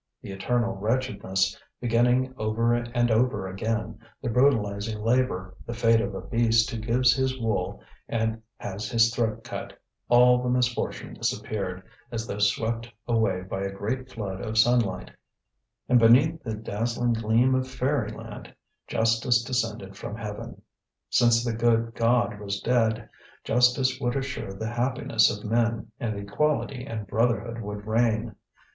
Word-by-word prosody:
The -, -, -7 dB
eternal 115 Hz, +4 st, -1 dB
wretchedness, 100 Hz, -4 st, 0 dB, 0.2 s
beginning 125 Hz, +2 st, +2 dB
over 115 Hz, +1 st, +1 dB
and 120 Hz, 0 st, 0 dB
over 110 Hz, -4 st, +1 dB
again, 110 Hz, +3 st, -3 dB, 0.2 s
the 120 Hz, -, -3 dB
brutalizing 110 Hz, -4 st, +1 dB
labour, 110 Hz, -5 st, 0 dB
the 120 Hz, -, -4 dB
fate 115 Hz, -1 st, +4 dB
of -, -, -3 dB
a -, -, -4 dB
beast 115 Hz, -1 st, +2 dB
who 115 Hz, -, -4 dB
gives 125 Hz, +3 st, +3 dB
his 130 Hz, 0 st, -1 dB
wool 110 Hz, -6 st, -2 dB, 0.3 s
and 110 Hz, -1 st, -1 dB, 0.2 s
has 100 Hz, +2 st, -5 dB
his 115 Hz, -2 st, +3 dB
throat 115 Hz, -1 st, -1 dB
cut, -, -, -7 dB, 0.3 s
all 125 Hz, +1 st, +6 dB
the 125 Hz, -, -1 dB
misfortune 125 Hz, -1 st, -1 dB
disappeared, 95 Hz, -3 st, -3 dB, 0.3 s
as 115 Hz, -1 st, -3 dB
though 105 Hz, -, -5 dB
swept 115 Hz, +3 st, 0 dB, 0.2 s
away 110 Hz, -6 st, +1 dB
by 95 Hz, +1 st, -4 dB
a 100 Hz, 0 st, -2 dB
great 115 Hz, +7 st, -4 dB
flood 95 Hz, -4 st, -5 dB
of 110 Hz, +1 st, -3 dB
sunlight; 115 Hz, -6 st, +2 dB, 0.8 s
and 125 Hz, -1 st, +5 dB
beneath 135 Hz, +8 st, +5 dB
the 110 Hz, -3 st, -4 dB
dazzling 115 Hz, +3 st, -1 dB
gleam 115 Hz, +3 st, +2 dB
of 130 Hz, 0 st, 0 dB
fairyland 130 Hz, -4 st, -3 dB, 0.3 s
justice 115 Hz, +1 st, +2 dB
descended 115 Hz, -6 st, -2 dB
from 105 Hz, -, -6 dB
heaven. 110 Hz, +1 st, -7 dB, 0.5 s
Since 120 Hz, 0 st, +4 dB
the 120 Hz, -, 0 dB
good 115 Hz, 0 st, +1 dB
God 115 Hz, -2 st, +1 dB
was 100 Hz, -1 st, -3 dB
dead, 115 Hz, -2 st, +1 dB, 0.4 s
justice 125 Hz, +2 st, +2 dB
would 120 Hz, -2 st, 0 dB
assure 135 Hz, -7 st, -3 dB
the 110 Hz, +4 st, -4 dB
happiness 120 Hz, -2 st, +2 dB
of 105 Hz, +1 st, -5 dB
men, 115 Hz, +1 st, 0 dB
and 110 Hz, -3 st, -2 dB
equality 130 Hz, +5 st, -1 dB
and 110 Hz, -4 st, -5 dB
brotherhood 115 Hz, +1 st, 0 dB
would 105 Hz, -1 st, -6 dB
reign. 110 Hz, -1 st, +1 dB
115 Hz, 145 wpm, -26 LUFS, 110-120 Hz, 0.8 s, all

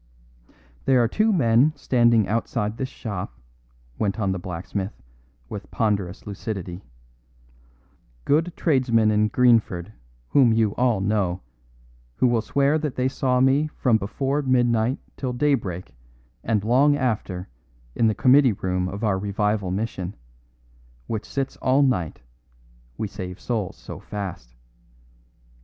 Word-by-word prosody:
"There 130 Hz, -2 st, +4 dB
are -, -, +3 dB
two 215 Hz, -, +2 dB
men 135 Hz, -, +4 dB
standing 120 Hz, -4 st, +3 dB
outside 110 Hz, 0 st, -1 dB
this 130 Hz, 0 st, -3 dB
shop," 90 Hz, -, -6 dB, 0.6 s
went 100 Hz, 0 st, -1 dB
on 100 Hz, -3 st, 0 dB
the 95 Hz, -, -2 dB
blacksmith 95 Hz, -, -5 dB, 0.5 s
with -, -, -8 dB
ponderous 100 Hz, -4 st, -1 dB
lucidity, 95 Hz, -3 st, -6 dB, 1.4 s
"good 160 Hz, +4 st, +2 dB
tradesmen 120 Hz, -8 st, +2 dB
in 105 Hz, 0 st, +3 dB
Greenford 110 Hz, -6 st, +2 dB, 0.4 s
whom 125 Hz, -, +5 dB
you 110 Hz, -2 st, +2 dB
all 120 Hz, -5 st, +1 dB
know, 95 Hz, -3 st, 0 dB, 0.7 s
who -, -, +1 dB
will 120 Hz, -2 st, +3 dB
swear 140 Hz, +6 st, +1 dB
that 150 Hz, -4 st, -3 dB
they 130 Hz, 0 st, +1 dB
saw 130 Hz, -1 st, 0 dB
me 135 Hz, +3 st, +3 dB
from 120 Hz, -4 st, +3 dB
before 135 Hz, +8 st, -1 dB
midnight 120 Hz, -2 st, +2 dB, 0.2 s
till 130 Hz, -2 st, -3 dB
daybreak 105 Hz, -, -1 dB, 0.5 s
and 110 Hz, -3 st, 0 dB
long 135 Hz, +6 st, +4 dB
after 105 Hz, -8 st, -2 dB, 0.5 s
in 115 Hz, -, +2 dB
the 110 Hz, -, +1 dB
committee 130 Hz, +1 st, +5 dB
room 90 Hz, -1 st, -2 dB
of 100 Hz, +4 st, -6 dB
our 100 Hz, -3 st, +1 dB
Revival 105 Hz, 0 st, -1 dB
Mission, 95 Hz, -1 st, -3 dB, 0.9 s
which 110 Hz, -, -4 dB
sits 135 Hz, -1 st, -3 dB
all 135 Hz, +2 st, +3 dB
night, 90 Hz, -, 0 dB, 0.8 s
we 110 Hz, -, -2 dB
save 90 Hz, -1 st, -7 dB
souls 110 Hz, -6 st, -3 dB
so -, -, -9 dB
fast. 90 Hz, -13 st, -7 dB
110 Hz, 130 wpm, -24 LUFS, 95-130 Hz, 1.4 s, whom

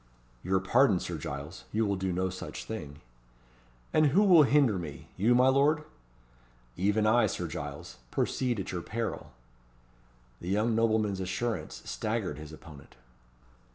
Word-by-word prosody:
"Your 95 Hz, +1 st, +1 dB
pardon, 100 Hz, +1 st, +3 dB
Sir 85 Hz, -2 st, -5 dB
Giles; 70 Hz, +5 st, -7 dB
you 110 Hz, +1 st, +1 dB
will 100 Hz, -1 st, 0 dB
do 95 Hz, 0 st, -2 dB
no 95 Hz, +1 st, -1 dB
such 95 Hz, -, -7 dB
thing." 75 Hz, -10 st, -7 dB, 0.9 s
"And 155 Hz, -1 st, +5 dB
who 180 Hz, +9 st, +4 dB
will 180 Hz, -6 st, +7 dB
hinder 135 Hz, -8 st, +4 dB
me? 80 Hz, -1 st, -8 dB
You, 115 Hz, +6 st, +3 dB
my 125 Hz, +1 st, +5 dB
lord?" 145 Hz, +3 st, +3 dB, 0.9 s
"Even 105 Hz, +3 st, +1 dB
I, 120 Hz, +3 st, +4 dB
Sir 90 Hz, -, -3 dB
Giles. 80 Hz, 0 st, -7 dB
Proceed 125 Hz, -, -1 dB
at 95 Hz, -, -4 dB
your 90 Hz, -, -3 dB
peril." 115 Hz, +5 st, -4 dB, 1.1 s
The 85 Hz, -, -6 dB
young 105 Hz, +4 st, +1 dB
nobleman's 110 Hz, -3 st, +1 dB
assurance 95 Hz, -1 st, -3 dB
staggered 105 Hz, -, -3 dB
his 75 Hz, 0 st, -9 dB
opponent. 75 Hz, -3 st, -13 dB
100 Hz, 145 wpm, -29 LUFS, 85-120 Hz, 1.1 s, will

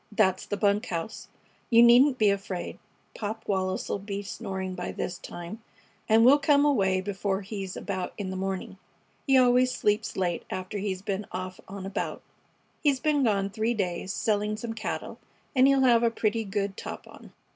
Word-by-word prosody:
"That's 190 Hz, -3 st, +1 dB
the 205 Hz, -, -2 dB
bunk 205 Hz, 0 st, +2 dB
house. 170 Hz, +4 st, -5 dB, 0.4 s
You 235 Hz, -1 st, +7 dB
needn't 250 Hz, +3 st, +6 dB
be 210 Hz, -3 st, +4 dB
afraid. 195 Hz, -2 st, -4 dB, 0.3 s
Pop 220 Hz, +1 st, -5 dB
Wallis 190 Hz, -1 st, -1 dB
'll -, -, -2 dB
be 200 Hz, 0 st, -5 dB
snoring 190 Hz, -1 st, -5 dB
by 180 Hz, -1 st, -4 dB
this 180 Hz, -, -4 dB
time, 175 Hz, +6 st, -8 dB, 0.5 s
and 225 Hz, +1 st, +6 dB
we'll 280 Hz, +4 st, +7 dB
come 285 Hz, 0 st, +4 dB
away 195 Hz, -10 st, +2 dB
before 195 Hz, 0 st, -2 dB
he's 195 Hz, -2 st, -6 dB
about 185 Hz, -3 st, -3 dB
in 195 Hz, -3 st, -4 dB
the -, -, -4 dB
morning. 190 Hz, 0 st, -4 dB, 0.5 s
He 270 Hz, -1 st, +5 dB
always 250 Hz, 0 st, +5 dB
sleeps 210 Hz, -2 st, 0 dB
late 175 Hz, -3 st, -1 dB
after 185 Hz, +2 st, -4 dB
he's 190 Hz, -1 st, -3 dB
been 200 Hz, 0 st, -3 dB
off 185 Hz, 0 st, -5 dB
on 195 Hz, 0 st, -7 dB
a -, -, -4 dB
bout. -, -, -3 dB, 0.6 s
He's 280 Hz, -3 st, +2 dB
been 300 Hz, -1 st, +2 dB
gone 200 Hz, -4 st, +1 dB
three 225 Hz, +3 st, 0 dB
days, 185 Hz, -2 st, -2 dB
selling 210 Hz, 0 st, 0 dB
some 225 Hz, 0 st, -5 dB
cattle, 225 Hz, 0 st, -5 dB, 0.4 s
and 260 Hz, +1 st, +6 dB
he'll 275 Hz, -1 st, +4 dB
have 240 Hz, -3 st, +5 dB
a 235 Hz, -, +4 dB
pretty 225 Hz, 0 st, -1 dB
good 200 Hz, 0 st, -2 dB
top -, -, -7 dB
on." -, -, -14 dB
205 Hz, 180 wpm, -27 LUFS, 190-230 Hz, 0.6 s, You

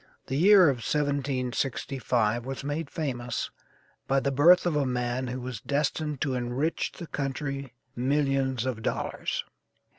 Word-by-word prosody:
The 135 Hz, -, -3 dB
year 190 Hz, +5 st, +7 dB
of 135 Hz, -3 st, +2 dB
1765 130 Hz, -4 st, 0 dB
was 135 Hz, +1 st, -5 dB
made 145 Hz, +1 st, -3 dB
famous 125 Hz, -6 st, -3 dB, 0.6 s
by 135 Hz, 0 st, +3 dB
the 140 Hz, +1 st, 0 dB
birth 170 Hz, +7 st, +6 dB
of 175 Hz, -3 st, +1 dB
a 145 Hz, -, +2 dB
man 125 Hz, 0 st, -1 dB
who 125 Hz, +1 st, -4 dB
was 125 Hz, -4 st, -6 dB
destined 150 Hz, 0 st, -1 dB
to 135 Hz, -, 0 dB
enrich 125 Hz, +6 st, -1 dB
his 170 Hz, -, -7 dB
country 140 Hz, -2 st, -3 dB, 0.2 s
millions 135 Hz, -1 st, +1 dB
of 125 Hz, -4 st, -2 dB
dollars. -, -, -2 dB
135 Hz, 140 wpm, -28 LUFS, 125-145 Hz, 0.6 s, year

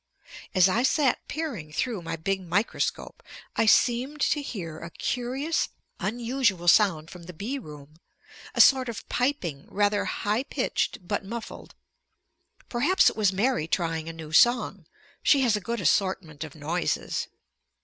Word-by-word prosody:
As 185 Hz, 0 st, +6 dB
I 215 Hz, +5 st, +1 dB
sat 265 Hz, +1 st, +1 dB
peering 260 Hz, -, -4 dB
through 220 Hz, +4 st, -2 dB
my 165 Hz, -, -4 dB
big 190 Hz, +4 st, -2 dB
microscope, 185 Hz, +5 st, -2 dB, 0.3 s
I 225 Hz, -, +2 dB
seemed 250 Hz, +6 st, +3 dB
to 295 Hz, -, +2 dB
hear 170 Hz, -, -6 dB
a 170 Hz, -, -8 dB
curious 260 Hz, -, -2 dB, 0.3 s
unusual 230 Hz, -2 st, 0 dB
sound 170 Hz, -5 st, +4 dB
from 175 Hz, -2 st, -11 dB
the 180 Hz, -, -9 dB
bee 230 Hz, -, -4 dB
room, 150 Hz, -, -12 dB, 0.6 s
a -, -, +6 dB
sort 260 Hz, -2 st, +6 dB
of 230 Hz, -1 st, -7 dB
piping 220 Hz, -, -1 dB
rather 205 Hz, 0 st, +1 dB
high 210 Hz, +4 st, -1 dB
pitched 240 Hz, -7 st, -2 dB
but 205 Hz, -, -1 dB
muffled. 225 Hz, +4 st, -8 dB, 0.9 s
Perhaps 285 Hz, +11 st, +3 dB
it -, -, -14 dB
was 210 Hz, -3 st, +2 dB
Mary 200 Hz, -3 st, 0 dB
trying 165 Hz, -2 st, -1 dB
a -, -, -6 dB
new 160 Hz, -2 st, -9 dB
song. 240 Hz, +9 st, +3 dB, 0.3 s
She 280 Hz, -, +4 dB
has 240 Hz, -4 st, +3 dB
a 210 Hz, -, -2 dB
good 235 Hz, +5 st, -3 dB
assortment 170 Hz, -3 st, 0 dB
of 155 Hz, -2 st, -9 dB
noises. 160 Hz, +3 st, -2 dB
205 Hz, 150 wpm, -26 LUFS, 165-245 Hz, 0.9 s, As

